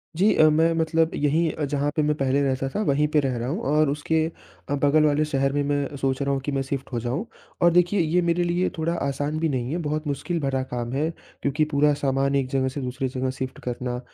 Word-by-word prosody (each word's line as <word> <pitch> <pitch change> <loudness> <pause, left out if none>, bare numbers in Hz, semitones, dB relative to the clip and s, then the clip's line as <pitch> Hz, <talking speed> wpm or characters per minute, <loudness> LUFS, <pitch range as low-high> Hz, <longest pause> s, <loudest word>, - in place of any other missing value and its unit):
जी 200 +5 +4
अ, - - +5
मैं 160 +2 +3
मतलब 160 0 +1
यहीं 155 +3 +1
अ, 150 - -3
जहाँ 145 +1 -1
पे 155 - +2
मैं 150 0 +1
पहले 135 +1 +1
रहता 135 -1 0
था 210 - +1
वहीं 150 -2 +2
पे 150 - +5
रह 135 -3 0
रहा 120 +1 -3
हूँ 185 +10 -2
और 155 -1 +3
उसके 155 +2 0 0.4
अ, 145 - +1
बगल 145 +2 +3
वाले 150 0 +3
शहर 135 -2 0
में 145 0 +1
मैं 145 0 -1
सोच 135 0 -1
रहा 140 0 0
हूँ 135 - 0
कि 145 - -3
मैं 135 -1 0
शिफ्ट 135 0 -4
हो 120 - 0
जाऊँ। 130 - -2 0.4
और 175 0 +6
देखिए 180 +3 +3
ये 170 +2 +2
मेरे 170 +1 +1
लिए 175 +1 +1
थोड़ा 165 +2 0
आसान 145 0 -2
भी 160 -1 +1
नहीं 130 -1 -2
है, 170 - -1
बहुत 155 -1 -2
मुश्किल 165 +4 -2
भरा 135 -2 -1
काम 120 -2 -4
है, 150 +4 0 0.3
क्योंकि 140 +2 +1
पूरा 145 +1 +4
सामान 140 0 0
1 135 -2 +1
जगह 130 -1 +1
से 135 +2 -4
दूसरी 130 +1 -2
जगह 130 0 -2
शिफ्ट 130 0 -4
करना 125 0 -3
145 Hz, 245 wpm, -24 LUFS, 135-155 Hz, 0.4 s, और